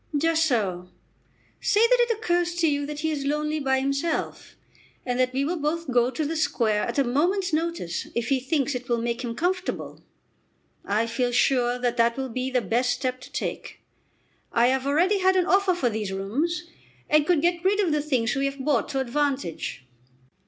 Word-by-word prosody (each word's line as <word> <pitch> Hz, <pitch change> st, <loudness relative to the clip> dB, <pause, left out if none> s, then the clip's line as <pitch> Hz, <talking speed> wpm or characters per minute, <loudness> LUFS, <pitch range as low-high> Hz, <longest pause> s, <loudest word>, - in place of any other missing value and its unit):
"Just 325 Hz, +1 st, +2 dB
so. 185 Hz, -, -1 dB, 0.7 s
Say 415 Hz, -, +2 dB
that -, -, +5 dB
it 475 Hz, -2 st, +2 dB
occurs 350 Hz, -5 st, 0 dB
to 340 Hz, -1 st, +2 dB
you 285 Hz, -1 st, 0 dB
that 300 Hz, 0 st, -5 dB
he 315 Hz, 0 st, 0 dB
is 290 Hz, -2 st, -3 dB
lonely 300 Hz, +1 st, -1 dB
by 265 Hz, -2 st, +1 dB
himself, 275 Hz, +4 st, -2 dB, 0.5 s
and 245 Hz, 0 st, -1 dB
that 255 Hz, 0 st, +2 dB
we 270 Hz, +2 st, 0 dB
will 340 Hz, +3 st, -2 dB
both 305 Hz, 0 st, -2 dB
go 240 Hz, 0 st, +3 dB
to 280 Hz, +4 st, -3 dB
the 320 Hz, +3 st, -2 dB
Square 225 Hz, -9 st, +1 dB
at 235 Hz, -, -4 dB
a 280 Hz, -, +4 dB
moment's 350 Hz, +9 st, 0 dB
notice 320 Hz, -, -2 dB
if 235 Hz, 0 st, -1 dB
he 270 Hz, -1 st, +2 dB
thinks 280 Hz, +1 st, 0 dB
it 250 Hz, 0 st, -6 dB
will 235 Hz, -, +2 dB
make 235 Hz, +1 st, -2 dB
him 230 Hz, -1 st, -4 dB
comfortable. 360 Hz, +6 st, -2 dB, 0.8 s
I 210 Hz, +3 st, 0 dB
feel 245 Hz, +1 st, -1 dB
sure 245 Hz, 0 st, +2 dB
that 245 Hz, -1 st, -1 dB
that 235 Hz, +1 st, +2 dB
will 265 Hz, -1 st, -3 dB
be 255 Hz, +2 st, -3 dB
the 255 Hz, -1 st, +1 dB
best 235 Hz, +5 st, 0 dB
step 255 Hz, +1 st, -2 dB
to -, -, -12 dB
take. -, -, -5 dB, 0.7 s
I 240 Hz, +1 st, +4 dB
have 265 Hz, +1 st, 0 dB
already 355 Hz, +8 st, +3 dB
had 375 Hz, 0 st, +3 dB
an 365 Hz, -2 st, +3 dB
offer 385 Hz, -1 st, +3 dB
for 250 Hz, -9 st, 0 dB
these 210 Hz, -2 st, -3 dB
rooms, 280 Hz, -, -2 dB, 0.4 s
and 300 Hz, -1 st, +3 dB
could 340 Hz, -4 st, +2 dB
get 345 Hz, 0 st, +1 dB
rid 400 Hz, +2 st, +2 dB
of 375 Hz, -6 st, +2 dB
the 300 Hz, 0 st, +1 dB
things 255 Hz, -6 st, 0 dB
we 275 Hz, 0 st, 0 dB
have 275 Hz, 0 st, -2 dB
bought 295 Hz, -1 st, +1 dB
to 275 Hz, -2 st, -1 dB
advantage." 265 Hz, -, -2 dB
275 Hz, 200 wpm, -25 LUFS, 245-330 Hz, 0.8 s, that